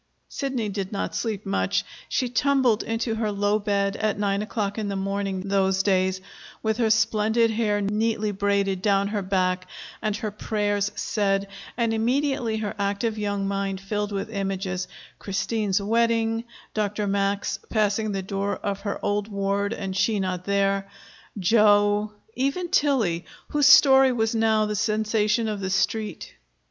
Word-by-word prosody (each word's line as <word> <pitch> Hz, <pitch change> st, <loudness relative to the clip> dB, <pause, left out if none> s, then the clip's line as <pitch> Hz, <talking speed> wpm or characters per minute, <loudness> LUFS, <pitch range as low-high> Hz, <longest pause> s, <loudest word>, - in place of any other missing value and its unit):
Sidney 260 Hz, -6 st, -2 dB
did 195 Hz, -1 st, -4 dB
not 200 Hz, -, -3 dB
sleep 215 Hz, -3 st, -3 dB
much. 95 Hz, -, 0 dB, 0.2 s
She 255 Hz, -, 0 dB
tumbled 250 Hz, -2 st, +2 dB
into 225 Hz, 0 st, -2 dB
her 220 Hz, -1 st, -1 dB
low 205 Hz, +1 st, +1 dB
bed 200 Hz, -1 st, 0 dB
at 215 Hz, -2 st, 0 dB
nine 200 Hz, -1 st, 0 dB
o'clock 210 Hz, -1 st, -3 dB
in 210 Hz, -, -2 dB
the 200 Hz, -, -2 dB
morning, 195 Hz, 0 st, -2 dB
those 190 Hz, -1 st, +1 dB
days, 185 Hz, -1 st, +1 dB, 0.4 s
with 220 Hz, -1 st, 0 dB
her 230 Hz, -3 st, +2 dB
splendid 220 Hz, +1 st, +3 dB
hair 210 Hz, -2 st, 0 dB
neatly 210 Hz, +1 st, 0 dB
braided 200 Hz, -1 st, 0 dB
down 200 Hz, 0 st, +2 dB
her 210 Hz, -1 st, -1 dB
back 185 Hz, -1 st, 0 dB, 0.3 s
and 215 Hz, -2 st, -1 dB
her 215 Hz, -, -3 dB
prayers 205 Hz, -1 st, -1 dB
said, 200 Hz, -2 st, 0 dB, 0.3 s
and 230 Hz, -2 st, +1 dB
immediately 240 Hz, 0 st, 0 dB
her 210 Hz, -2 st, -3 dB
active 205 Hz, +2 st, -1 dB
young 205 Hz, -1 st, -1 dB
mind 195 Hz, -1 st, -2 dB
filled 205 Hz, +1 st, -3 dB
with 205 Hz, +3 st, -4 dB
images 195 Hz, -2 st, -2 dB, 0.3 s
Christine's 205 Hz, 0 st, -1 dB
wedding, 225 Hz, +1 st, +1 dB, 0.3 s
Dr. 210 Hz, 0 st, -1 dB
Max 200 Hz, 0 st, 0 dB
passing 215 Hz, 0 st, +1 dB
the 195 Hz, -1 st, -3 dB
door 195 Hz, +1 st, -2 dB
of 200 Hz, -1 st, -3 dB
her 200 Hz, 0 st, -3 dB
old 205 Hz, 0 st, 0 dB
ward 200 Hz, 0 st, -1 dB
and 195 Hz, -4 st, -4 dB
she 210 Hz, +2 st, +1 dB
not 185 Hz, -1 st, -2 dB
there, 195 Hz, 0 st, +1 dB, 0.5 s
Joe 205 Hz, +1 st, +3 dB, 0.2 s
even 275 Hz, +8 st, -1 dB
Tillie, 225 Hz, -, +2 dB, 0.3 s
whose 295 Hz, -1 st, +3 dB
story 270 Hz, -3 st, +7 dB
was 225 Hz, -2 st, 0 dB
now 220 Hz, -1 st, +2 dB
the 210 Hz, 0 st, -2 dB
sensation 215 Hz, +1 st, +1 dB
of 210 Hz, -2 st, -3 dB
the 190 Hz, -1 st, -3 dB
Street. 205 Hz, +3 st, -1 dB
205 Hz, 155 wpm, -25 LUFS, 195-220 Hz, 0.5 s, story